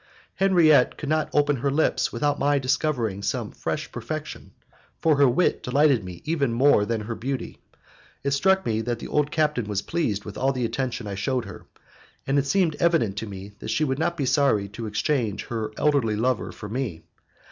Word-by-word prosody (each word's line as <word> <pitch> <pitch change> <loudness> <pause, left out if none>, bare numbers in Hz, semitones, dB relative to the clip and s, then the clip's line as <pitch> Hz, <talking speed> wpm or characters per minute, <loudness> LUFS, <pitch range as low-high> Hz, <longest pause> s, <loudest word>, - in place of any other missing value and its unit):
Henriette 170 -9 +4
could 145 - -5
not 155 0 +1
open 145 -1 +2
her 140 +4 0
lips 150 +3 +1
without 145 -1 0
my 145 0 +2
discovering 130 -6 0
some - - -2
fresh - - -4
perfection, - - -6 0.5
for 155 -3 +3
her 140 -2 +5
wit 150 +9 +1
delighted 135 -3 +3
me 90 -2 -9
even 150 -6 0
more 115 -3 +4
than 115 -1 -1
her 110 +2 -4
beauty. 130 +3 -5 0.6
It 140 - 0
struck 190 +7 +3
me 110 -1 0
that 120 +1 -2
the - - -7
old 150 -1 +1
captain 150 -6 0
was 105 -1 -2
pleased 110 -12 -1
with 105 - -7
all 135 +1 +2
the 125 -2 -1
attention 125 -1 -3
I 100 - -4
shewed 125 +6 -1
her, - - -11 0.6
and 140 +1 +2
it 140 - -1
seemed 175 -5 +2
evident 165 - +2
to 110 - -3
me 100 +1 -8
that - - -7
she 155 - +1
would 135 -2 -1
not 170 +2 0
be 140 - -1
sorry 130 -7 +2
to 110 +3 -6
exchange 105 -1 -1
her 110 -2 -3
elderly 140 -8 +2
lover 125 +2 0
for 105 - -9
me. 105 -8 -4
130 Hz, 195 wpm, -25 LUFS, 110-150 Hz, 0.6 s, her